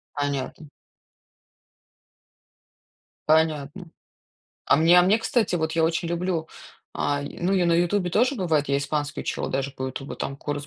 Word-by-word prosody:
Понятно. 145 +1 -3 2.6
Понятно. 160 +2 +1 0.8
А - - +4
мне 165 +3 +6
а - - +7
мне, 195 +5 +3
кстати 225 -3 0
вот, 160 -2 -1
я 165 0 +2
очень 165 +1 -1
люблю 170 -1 -2 0.5
ай, 145 0 -2
ну, 180 +2 +1
я 185 -2 +2
на 170 - +3
"Ютубе" 175 +2 +1
тоже 250 +9 +2
бывает, 160 - 0
я 140 - +2
испанский 145 +1 -2
учила - - -3
даже 135 +1 -2
по 130 -1 -5
"Ютубу", 130 +1 -6
там 140 - -5
курс 145 0 -5
160 Hz, 145 wpm, -24 LUFS, 145-175 Hz, 2.6 s, а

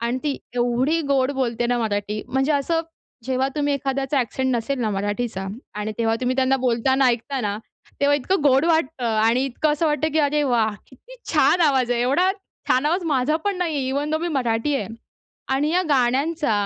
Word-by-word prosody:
आणि 235 +2 -1
ती 285 -2 0 0.2
एवढी 245 +6 +1
गोड 270 -1 +2
बोलते 240 -3 -1
ना 245 0 0
मराठी. 210 -1 -2
म्हणजे 265 +4 +1
असं 325 +4 +1 0.4
जेव्हा 260 +1 0
तुम्ही 290 -1 +1
एखाद्याचा 270 0 -1
एक्सेंट 260 +2 -1
नसेल 240 +3 -2
ना 220 -2 0
मराठीचा 205 0 -3 0.3
आणि 210 +1 -3
तेव्हा 225 -1 +1
तुम्ही 255 +1 0
त्यांना 265 0 +3
बोलताना 260 +3 +2
ऐकताना, 235 -3 -1 0.4
तेव्हा 285 +1 +4
इतकं 305 +4 -1
गोड 275 +1 +4
वाटतं 320 -5 0
आणि 230 +4 +3
इतकं 275 +3 0
असं 310 +2 0
वाटतं, 305 +1 +1
की 315 - +1
अरे 295 0 +2
वाह! 230 -5 +1
किती 475 - -16 0.2
छान 355 - +4
आवाज 265 -6 +3
आहे. 240 - +1
एवढा 285 +10 +2 0.4
छान 260 +4 +3
आवाज 350 +3 0
माझा 295 0 +1
पण 405 -2 0
नाही 335 -4 -1
आहे, 265 -2 -1
इव्हन 285 +3 -1
दो 315 - +1
मी 345 - -2
मराठी 260 -1 0
आहे 205 -7 -4 0.7
आणि 290 +3 +1
या 360 +2 +2
गाण्यांचा 275 +2 +1
265 Hz, 185 wpm, -22 LUFS, 240-295 Hz, 0.7 s, तेव्हा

